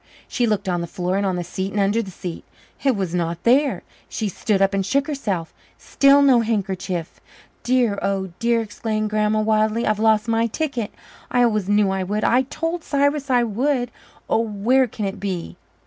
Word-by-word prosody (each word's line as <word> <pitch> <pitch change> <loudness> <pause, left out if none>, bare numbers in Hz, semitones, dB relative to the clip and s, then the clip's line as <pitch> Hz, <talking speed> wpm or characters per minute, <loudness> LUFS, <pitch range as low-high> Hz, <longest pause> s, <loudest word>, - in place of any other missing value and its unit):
She 240 -2 0
looked 210 -2 -1
on 175 -2 0
the 170 - -4
floor 180 +2 -2
and 200 0 +1
on 185 - 0
the 175 - -2
seat 190 +3 -4
and 210 - -1
under 200 +3 +2
the 200 - -7
seat. 180 -2 -7 0.4
It 270 -3 +3
was 190 -4 -3
not 170 -1 -2
there. 275 +4 +3 0.3
She 215 -2 -2
stood 200 +2 0
up 195 0 +2
and 195 0 +1
shook 275 +8 +1
herself 205 - -3 0.2
still 280 +1 +4
no 265 -4 +5
handkerchief. 190 -6 -3 0.4
"Dear, 240 -5 +1
oh 190 -2 -1
dear," 235 0 +2
exclaimed 215 0 -3
Grandma 215 0 +1
wildly, 215 +1 +1
"I've 215 -1 +1
lost 220 0 +3
my 230 0 +2
ticket 245 -3 -3 0.4
I 245 -1 +3
always 215 -4 +1
knew 205 -1 +3
I 190 0 -1
would 205 +3 -2
I 250 +2 +4
told 330 +5 -4
Cyrus 285 0 0
I 245 -2 +4
would! 245 +3 0 0.4
Oh, - - +2
where 230 +4 +2
can 215 -2 -5
it 195 +1 -4
be?" 185 -4 -4
215 Hz, 195 wpm, -22 LUFS, 195-245 Hz, 0.4 s, no